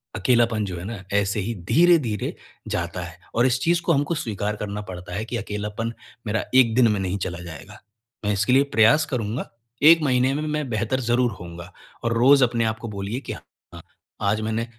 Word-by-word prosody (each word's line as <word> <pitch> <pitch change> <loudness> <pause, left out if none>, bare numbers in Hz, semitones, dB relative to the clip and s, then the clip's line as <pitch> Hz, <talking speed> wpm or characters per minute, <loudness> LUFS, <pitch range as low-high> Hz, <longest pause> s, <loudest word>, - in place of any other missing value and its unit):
अकेलापन 115 0 +2
जो 90 -3 -5
है 85 - -7
ना, 105 -3 -6
ऐसे 100 +1 +1
ही 110 +5 -3 0.2
धीरे-धीरे 155 - +3 0.3
जाता - - -3
है - - -10 0.2
और 120 +2 +3
इस 125 -1 +2
चीज़ 170 +1 +2
को 170 - +2
हमको 145 +4 0
स्वीकार 105 -7 -3
करना 105 0 -5
पड़ता 90 -1 -8
है 105 - -2
कि, 120 +1 -4
"अकेलापन 105 +1 -4 0.3
मेरा 105 0 -1
1 120 -4 +6
दिन 125 -2 +5
में 105 - 0
नहीं 95 +1 -2
चला 90 -2 -4
जाएगा। 85 -4 -10 0.5
मैं 105 - +2
इसके 105 +5 +1
लिए 135 +1 +6
प्रयास 115 +8 +5
करूँगा। 115 -1 -2 0.4
1 165 -1 +5
महीने 130 -1 +2
में 150 +2 -2
मैं 145 -4 -3
बेहतर 115 +4 -1
ज़रूर 120 0 +2
होऊँगा।" 85 +1 -9 0.3
और 115 0 +1
रोज़ 135 +2 +6
अपने 120 -1 +1
आपको 115 +1 -9
बोलिए 100 +6 -3
कि - - -6
अ - - -9 0.3
अ, - - -9 0.4
आज 105 +2 +1
मैंने 110 +1 -1
115 Hz, 200 wpm, -23 LUFS, 105-125 Hz, 0.5 s, 1